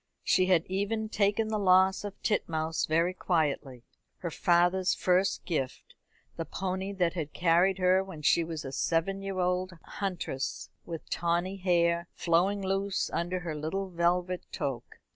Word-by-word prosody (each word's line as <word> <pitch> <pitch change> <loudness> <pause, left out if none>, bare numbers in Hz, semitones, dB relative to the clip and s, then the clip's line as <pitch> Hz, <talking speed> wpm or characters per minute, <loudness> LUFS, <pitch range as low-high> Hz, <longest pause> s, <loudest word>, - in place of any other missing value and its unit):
She 185 0 +3
had 175 -3 +3
even 205 +3 -2
taken 210 +1 +1
the 215 -1 -1
loss 190 0 +4
of 205 -1 -7
Titmouse 160 -6 0
very 165 +3 +2
quietly 145 -8 -1 0.3
her 170 - -5
father's 175 +3 +3
first 185 +2 +1
gift, 135 -7 -3 0.4
the 165 - -2
pony 190 +3 -3
that 180 -3 +1
had 155 -4 -4
carried 175 +2 +3
her 185 0 +3
when 165 -6 -10
she 170 - +4
was 160 -3 -5
a 135 - -5
seven 165 +7 0
year 195 -1 -4
old 180 0 0
huntress 180 -9 -4 0.2
with 165 -2 -6
tawny 175 +3 0
hair 170 -2 +2
flowing 185 +4 +1
loose 195 +1 -1
under 180 +2 -1
her 170 -3 -4
little 185 +6 -3
velvet 175 +1 +1
toque. 125 -4 -4
180 Hz, 150 wpm, -29 LUFS, 165-190 Hz, 0.4 s, loss